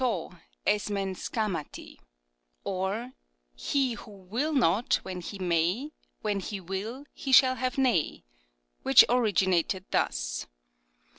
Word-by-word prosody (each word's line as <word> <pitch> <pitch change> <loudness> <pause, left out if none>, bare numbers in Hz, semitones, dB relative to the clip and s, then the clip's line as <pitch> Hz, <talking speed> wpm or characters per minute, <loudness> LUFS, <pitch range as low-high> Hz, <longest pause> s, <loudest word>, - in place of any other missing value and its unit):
^ 220 -11 -1 0.3
iapev 200 -2 0
aKafifiari^; 190 - -4 0.6
or, 195 +7 -2 0.4
He 260 - 0
who 230 -1 -10
will 205 +10 -3
not, 235 - +3
when 185 -1 -5
he 200 +4 -7
may, 180 - 0 0.3
When 205 -2 0
he 200 +1 -5
will 200 +9 -5
he 270 - -5
shall 260 0 +7
have 255 +2 -2
nay, 245 - +1 0.6
which 135 - +8
originated 190 -6 +2
thus. - - -1
200 Hz, 115 wpm, -28 LUFS, 185-245 Hz, 0.6 s, which